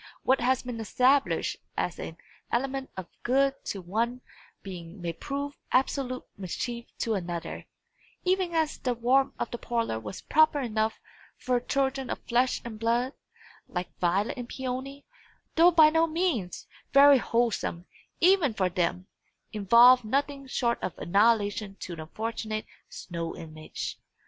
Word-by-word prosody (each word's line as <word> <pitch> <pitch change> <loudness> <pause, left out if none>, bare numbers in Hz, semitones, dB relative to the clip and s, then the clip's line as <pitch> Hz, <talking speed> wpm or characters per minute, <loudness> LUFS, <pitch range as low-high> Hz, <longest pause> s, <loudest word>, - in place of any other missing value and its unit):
What 260 -1 +3
has 255 +1 +2
been 245 -2 -5
established 255 +5 +2 0.2
as - - -2
an - - -6 0.3
element 270 +2 -1
of 185 - -4 0.2
good 275 +2 +1
to 195 - -4
one 230 +7 -1 0.4
being 180 -1 -8
may 170 -1 -3
prove 280 - -5
absolute 255 -1 +1 0.2
mischief 235 +6 -4
to 225 - 0
another; 175 -4 -4 0.6
even 365 -2 +1
as 315 -2 0
the 250 -2 -1
warmth 260 +4 +2
of - - -3
the 240 - -5
parlour 230 - -1
was 105 -3 -8
proper 310 -1 +4
enough 220 -3 -1 0.4
for 250 -1 0
children 270 +1 -1
of - - -2
flesh 245 +2 +1
and 220 -2 -7
blood, 240 +4 +1 0.5
like 180 0 -5
Violet 190 +8 +1
and 245 0 -6
Peony 265 +2 -5 0.5
though 335 +2 +7
by 315 -3 +6
no 325 +1 +3
means 310 - -1 0.3
very 280 0 +8
wholesome, 230 -8 -1 0.3
even 345 - +4
for 185 -3 +1
them 180 +1 -1 0.5
involved 235 +5 +7
nothing 275 +4 -1
short 235 -2 0
of - - -4
annihilation 205 0 +2
to 175 - -5
the 160 - -7
unfortunate 215 +5 -4 0.2
snow 170 -2 -5
image. 155 -2 -7
240 Hz, 140 wpm, -28 LUFS, 200-275 Hz, 0.6 s, very